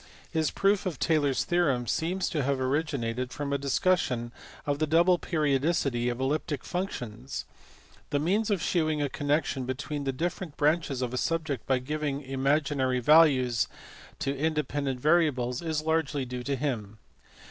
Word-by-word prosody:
His 160 -2 +1
proof 195 0 +1
of 175 - -3
Taylor 155 -3 +2
s 135 - 0
theorem 150 -9 +1
seems 170 - -1
to 155 - -1
have 135 0 0
originated 130 -3 -1
from 145 -1 -3
a 140 - 0
discussion 135 -4 +1 0.3
of 145 0 -1
the 155 - +1
double 170 +3 +4
periodicity 140 -5 +1
of 120 0 -3
elliptic 145 +1 -1
functions. 125 - -4 0.6
The 145 - +1
means 195 +9 +1
of 195 -4 0
shewing 155 -4 +1
a 145 -1 0
connection 145 -1 0
between 140 +3 -3
different 165 +4 -3
branches 150 -3 +1
of 125 0 -3
a - - -1
subject 160 -5 -1
by 130 - +3
giving 145 +2 -3
imaginary 135 -1 +1
values 130 -4 +5 0.5
to 140 +1 -2
independent 145 -3 -1
variables 135 -5 +2
is 160 -2 -2
largely 155 -4 0
due 125 0 -5
to 140 - 0
him. 115 -7 -3
145 Hz, 150 wpm, -28 LUFS, 130-160 Hz, 0.6 s, values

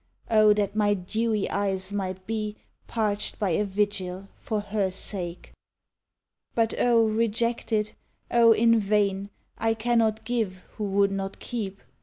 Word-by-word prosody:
O 215 -1 +6
that 205 -1 -1
my 205 -1 +3
dewy 215 +3 -1
eyes 195 -1 -1
might 190 -2 -3
be 215 -1 -3 0.3
Parched 210 -3 -1
by 200 -4 0
a 185 - +2
vigil 195 -2 -2
for 215 - -3
her 205 -1 -1
sake! 185 -2 -5 1.0
But 225 -1 +2
O 235 -2 +4
rejected! 220 0 0 0.4
O 235 -1 +6
in 230 +1 +5
vain! 200 -1 +1 0.3
I 225 0 +1
cannot 225 -1 +1
give 220 -6 -2
who 215 - -2
would 200 0 +2
not 195 0 -3
keep. 200 -5 -5
210 Hz, 135 wpm, -26 LUFS, 195-225 Hz, 1.0 s, O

